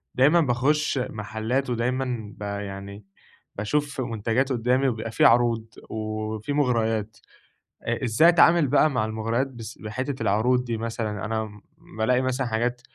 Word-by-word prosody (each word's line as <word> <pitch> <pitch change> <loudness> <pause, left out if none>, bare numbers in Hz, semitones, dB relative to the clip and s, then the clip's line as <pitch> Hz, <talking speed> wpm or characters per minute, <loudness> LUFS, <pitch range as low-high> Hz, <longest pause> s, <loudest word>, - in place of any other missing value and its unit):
دايمًا 150 +7 +5
باخش 145 +2 +1
محلات 115 +2 -2
ودايمًا 120 -2 -2
ب - - -19
يعني، 100 0 -6 0.5
باشوف 140 +6 -1
منتجات 115 +3 -1
قدامي 125 +2 +2
وبيبقى 115 -2 -3
في - - +3
عروض 115 -1 +4 0.2
وفي 110 +3 -4
مغريات، 115 -6 0 0.7
أ - - -2
إزاي 125 +8 +5
أتعامل 170 -2 +5
بقى 145 +3 +4
مع 125 -7 0
المغريات 115 +4 -1
بس 120 -4 -9
بحتّة 130 +5 -4
العروض 115 +5 +2
دي 115 -2 -2
مثلًا، 110 -2 -3
أنا 110 -1 -4 0.4
بالاقي 125 +3 +2
مثلًا 130 0 -1
حاجات 120 +2 -1
115 Hz, 135 wpm, -25 LUFS, 110-130 Hz, 0.7 s, دايمًا